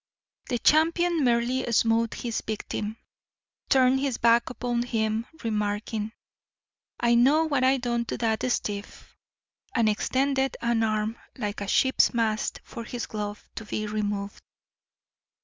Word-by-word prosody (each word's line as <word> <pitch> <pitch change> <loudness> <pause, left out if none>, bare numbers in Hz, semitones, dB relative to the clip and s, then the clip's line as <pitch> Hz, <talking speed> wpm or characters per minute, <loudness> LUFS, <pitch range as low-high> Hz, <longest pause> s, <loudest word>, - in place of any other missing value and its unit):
The 245 - +1
champion 330 +4 +3
merely 240 +1 +1
smote 230 0 +2
his 235 -2 -3
victim, 215 0 -4 0.7
turned 260 0 +4
his 270 -3 -1
back 235 +1 +4
upon 245 -1 -2
him, 225 -1 -1 0.2
remarking, 210 0 -2 0.9
"I 235 0 +3
know 275 +7 +5
what 280 -5 +1
I 265 +1 +4
done 240 -2 -1
to - - -4
dat 220 -2 0
stiff," 205 -3 -4 0.6
and 230 -3 +3
extended 265 +5 +1
an 235 -1 +1
arm 215 +1 -1 0.2
like 210 -4 -3
a 200 - -3
ship's 260 +3 +3
mast 220 -2 0
for 235 - -8
his 240 +1 -5
glove 210 -1 -6
to - - -6
be 215 0 -3
removed. 205 -1 -3
235 Hz, 130 wpm, -26 LUFS, 215-255 Hz, 0.9 s, know